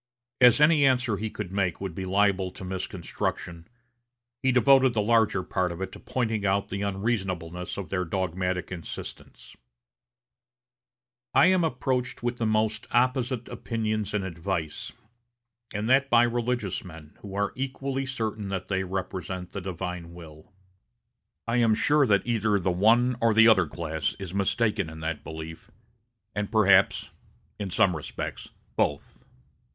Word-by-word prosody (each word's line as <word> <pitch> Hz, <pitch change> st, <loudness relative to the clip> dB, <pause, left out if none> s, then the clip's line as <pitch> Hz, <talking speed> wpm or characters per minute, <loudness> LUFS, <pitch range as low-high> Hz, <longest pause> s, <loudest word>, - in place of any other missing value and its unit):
As 125 Hz, 0 st, +7 dB
any 150 Hz, -1 st, +5 dB
answer 125 Hz, -5 st, +2 dB
he 110 Hz, +2 st, -3 dB
could 105 Hz, -4 st, -6 dB
make 95 Hz, -4 st, 0 dB
would 95 Hz, -3 st, -4 dB
be 95 Hz, +2 st, -5 dB
liable 95 Hz, 0 st, +2 dB
to 95 Hz, -, -10 dB
misconstruction, 90 Hz, -2 st, -4 dB, 0.7 s
he 130 Hz, -, +3 dB
devoted 130 Hz, 0 st, +5 dB
the -, -, +2 dB
larger 110 Hz, -4 st, +3 dB
part 90 Hz, -1 st, -1 dB
of 85 Hz, -, -7 dB
it 95 Hz, -, -4 dB
to -, -, -11 dB
pointing 110 Hz, -5 st, -2 dB
out 100 Hz, 0 st, +1 dB
the 100 Hz, +1 st, -3 dB
unreasonableness 95 Hz, -4 st, -2 dB
of 95 Hz, -5 st, -6 dB
their 90 Hz, -1 st, 0 dB
dogmatic 90 Hz, 0 st, -2 dB
insistence: 85 Hz, -4 st, -9 dB, 1.8 s
"I 135 Hz, -, +7 dB
am 185 Hz, -2 st, +2 dB
approached 125 Hz, -3 st, -1 dB
with 120 Hz, 0 st, -1 dB
the 115 Hz, -, +1 dB
most 110 Hz, 0 st, 0 dB
opposite 125 Hz, 0 st, +1 dB
opinions 110 Hz, -3 st, -3 dB
and 100 Hz, -, 0 dB
advice, 85 Hz, -2 st, -4 dB, 0.8 s
and 105 Hz, +1 st, -3 dB
that 135 Hz, +2 st, +4 dB
by 120 Hz, 0 st, +6 dB
religious 120 Hz, -4 st, -1 dB
men, 80 Hz, -4 st, -12 dB
who 100 Hz, -1 st, -9 dB
are 100 Hz, 0 st, 0 dB
equally 135 Hz, 0 st, -3 dB
certain 110 Hz, -6 st, -3 dB
that 95 Hz, -1 st, -4 dB
they 95 Hz, -1 st, 0 dB
represent 95 Hz, -1 st, -5 dB
the 100 Hz, -, -5 dB
divine 90 Hz, -1 st, -5 dB
will. 80 Hz, +1 st, -13 dB, 1.0 s
I 115 Hz, +1 st, +1 dB
am 115 Hz, -2 st, +4 dB
sure 145 Hz, +3 st, +3 dB
that 100 Hz, -3 st, +3 dB
either 110 Hz, -3 st, +1 dB
the 95 Hz, -1 st, 0 dB
one 115 Hz, +7 st, +3 dB
or 115 Hz, -2 st, +3 dB
the 115 Hz, +1 st, +7 dB
other 95 Hz, -7 st, +5 dB
class 80 Hz, -1 st, -3 dB
is 95 Hz, -3 st, -7 dB
mistaken 100 Hz, -1 st, 0 dB
in 80 Hz, 0 st, -9 dB
that 80 Hz, -1 st, -3 dB
belief, 80 Hz, +1 st, -8 dB, 0.6 s
and 105 Hz, -1 st, -3 dB
perhaps, 100 Hz, -3 st, +4 dB, 0.5 s
in 100 Hz, -2 st, -3 dB
some 95 Hz, -1 st, +3 dB
respects, 75 Hz, -, -6 dB, 0.3 s
both. -, -, -2 dB
100 Hz, 150 wpm, -27 LUFS, 90-120 Hz, 1.8 s, As